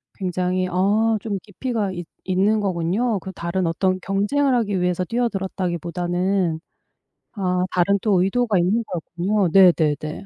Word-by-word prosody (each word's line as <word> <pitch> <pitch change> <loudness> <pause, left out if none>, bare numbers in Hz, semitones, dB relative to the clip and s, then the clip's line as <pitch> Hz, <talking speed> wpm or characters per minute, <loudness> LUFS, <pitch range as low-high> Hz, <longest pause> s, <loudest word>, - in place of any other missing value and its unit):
굉장히 185 0 -1
아 210 +5 +2
좀 210 -3 -3
깊이가 215 0 -3
있 175 -2 -6 0.2
있는 195 +4 +2
거군요, 195 +4 0
그 190 +1 -8
다른 175 +2 -2
어떤 185 +3 0
경쟁을 210 +10 +1
하기 205 -6 0
위해서 180 0 0
뛰어들었다기보다는. 180 -4 -1 0.8
아 180 -2 0
다른 195 +3 +2
또 200 -5 +2
의도가 215 +2 +1
있는 185 +7 +2
거였군요. 180 +4 -1
네네네. 160 -3 +3
190 Hz, 305 characters per minute, -22 LUFS, 180-205 Hz, 0.8 s, 네네네